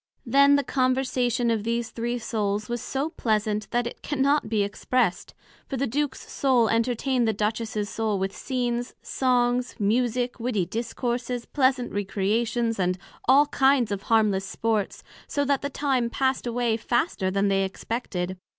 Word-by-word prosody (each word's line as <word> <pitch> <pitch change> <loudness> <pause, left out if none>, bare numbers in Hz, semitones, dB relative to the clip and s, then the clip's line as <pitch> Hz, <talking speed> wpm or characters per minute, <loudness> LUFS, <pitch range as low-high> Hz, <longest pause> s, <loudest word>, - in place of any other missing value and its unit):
Then 280 +1 +5
the 285 - +2
Conversation 255 -2 +1
of 220 -2 0
these 235 0 -2
three 240 +1 -2
souls 215 -3 -2
was 240 -1 -3
so 275 +4 -2
pleasant, 215 -4 -1
that 240 0 0
it 235 - -6
cannot 280 -3 +1
be 215 -2 +2
expressed; 205 0 -1 0.3
for 270 - -3
the 275 - 0
Duke's 275 +2 -2
Soul 250 -5 +2
entertained 240 +2 +1
the 220 -2 0
Empress's 215 -1 -1
Soul 215 0 -1
with 195 +1 -2
Scenes, 245 -2 -2
songs, 250 -1 +1
Musick, 245 +3 0
witty 230 -6 0
Discourses, 240 +4 -3
pleasant 260 -3 +1
Recreations, 220 +3 0
and 180 0 +1 0.3
all 275 +3 +6
kinds 270 -5 +3
of 200 -1 -2
harmless 215 -4 +2
sports, 215 0 -2 0.2
so 285 0 0
that 280 -1 +1
the 280 - -2
time 265 -4 0
passed 265 0 0
away 235 -1 0
faster 230 - 0
than 195 +1 +1
they 195 0 +2
expected. 185 -2 -4
235 Hz, 150 wpm, -25 LUFS, 215-255 Hz, 0.3 s, all